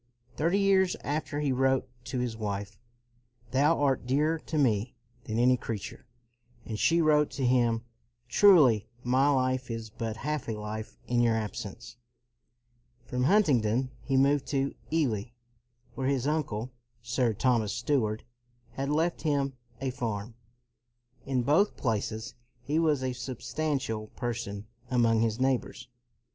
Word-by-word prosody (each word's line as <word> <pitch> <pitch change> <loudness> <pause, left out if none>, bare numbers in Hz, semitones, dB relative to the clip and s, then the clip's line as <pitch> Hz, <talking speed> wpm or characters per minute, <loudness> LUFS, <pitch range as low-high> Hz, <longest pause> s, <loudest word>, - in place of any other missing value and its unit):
Thirty 170 +6 +1
years 195 -2 +3
after 150 0 -2
he 145 -2 +1
wrote 130 0 +2 0.2
to 130 +1 -4
his 125 -2 -2
wife, 100 -2 -4 0.4
" 120 0 -33
Thou 145 +5 +3
art 135 -4 +1
dearer 150 +5 +2
to 155 - -4
me 120 -4 +1 0.3
than 110 - -3
any 125 +2 +4
creature"; 115 +1 -6 0.6
and 110 -2 -5
she 170 +1 +3
wrote 150 -2 +4
to 135 - -2
him, 120 -2 +2 0.2
" 120 0 -47
Truly 135 - +6 0.2
my 130 +3 +3
life 130 -2 +1
is 115 -1 -5
but 115 0 -4
half 150 0 -2
a - - -1
life 105 +1 -6
in 120 0 +1
your 115 -1 +3
absence.'' 110 +2 -5 1.1
From 125 +1 -1
Huntingdon, 130 - +3
he 135 +1 0
moved 140 +1 +3
to 140 -1 0 0.2
Ely 125 -11 +1 0.7
where 130 +2 -2
his 135 -2 0
uncle, 130 -6 -1 0.3
Sir 120 -1 0
Thomas 115 -2 +2
Steward, 120 -4 0 0.5
had 135 +3 -3
left 160 +4 0
him 140 -3 0 0.3
a 135 -1 -2
farm. 115 -3 -4 0.9
In 130 -2 +1
both 155 - +3
places 110 0 -2 0.3
he 150 +5 0
was 150 -5 +2
a 130 -1 -1
substantial 130 -2 -3
person 105 -4 -4 0.2
among 115 -3 +3
his 115 0 0
neighbors. 130 -1 -1
125 Hz, 140 wpm, -29 LUFS, 115-145 Hz, 1.1 s, Truly